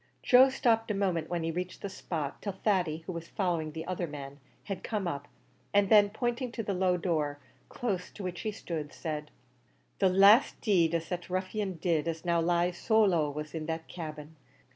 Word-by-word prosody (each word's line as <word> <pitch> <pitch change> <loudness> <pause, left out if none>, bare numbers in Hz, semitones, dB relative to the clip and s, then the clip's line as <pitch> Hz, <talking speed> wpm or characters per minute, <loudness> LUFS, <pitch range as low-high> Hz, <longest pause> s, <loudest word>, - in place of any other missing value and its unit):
Joe 260 +2 +7
stopped 225 -4 +1
a 210 - 0
moment 180 -5 0
when 170 -1 -1
he 165 - -1
reached 180 +2 -5
the - - -1
spot, 165 -6 -4
till 200 - -3
Thady, 180 -5 0
who - - -4
was 170 -1 -6
following 170 -6 -1
the 160 +1 -6
other 180 -1 -2
man, 140 -1 -8 0.2
had 195 -2 -5
come 210 -5 -2
up, 140 -4 -4 0.5
and 205 -1 +4
then, 205 -2 +7
pointing 240 +3 -2
to 225 - -3
the 200 - -2
low 180 -1 +2
door, 155 -5 -1 0.3
close 195 -7 -3
to 205 - -8
which 180 -1 -4
he 215 - -2
stood, 160 -7 -5
said, 150 -2 -4 0.7
"The 190 - +4
last 200 +6 +6
deed 170 -6 +3
as 165 -1 -2
that 175 0 -4
ruffian 185 +2 -2
did 165 -1 0
as 165 +1 -3
now 170 -1 +2
lies 175 +1 +1
so 220 -1 +4
low 170 -7 +2
was 150 +1 -6
in 155 -2 -4
that 160 0 -4
cabin. 155 -2 -8
180 Hz, 200 wpm, -30 LUFS, 160-200 Hz, 0.7 s, Joe